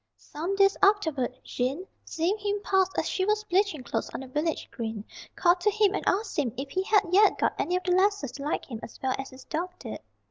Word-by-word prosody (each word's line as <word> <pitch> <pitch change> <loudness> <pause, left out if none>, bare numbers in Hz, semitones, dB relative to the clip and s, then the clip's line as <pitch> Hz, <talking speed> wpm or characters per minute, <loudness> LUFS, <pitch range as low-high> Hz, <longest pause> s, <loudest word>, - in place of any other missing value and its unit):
Some 335 +6 -4
days 395 0 +5
afterward, 320 - +3
Jean, 270 +9 -2 0.2
seeing 335 +5 0
him 410 0 -1
pass 380 -1 +3
as - - +1
she 375 - 0
was 425 +2 +1
bleaching 380 -7 +1
clothes 235 - -3
on - - -4
the 265 - -8
village 300 +5 -2
green, 220 -3 -5 0.3
called 350 0 +4
to 420 - +3
him 415 -1 +3
and - - -2
asked 395 -2 0
him 255 -6 0
if 270 +1 -5
he 375 - 0
had 410 +2 +3
yet 405 +2 +5
got - - +1
any 355 - 0
of 365 - -1
the 360 - 0
lasses 375 -7 +2
to 275 +2 -8
like 295 - -2
him 230 -4 -7
as - - -10
well 260 -1 +1
as 270 - -5
his 260 0 -13
dog 335 +4 -2
did. - - -7
360 Hz, 235 wpm, -27 LUFS, 275-400 Hz, 0.3 s, days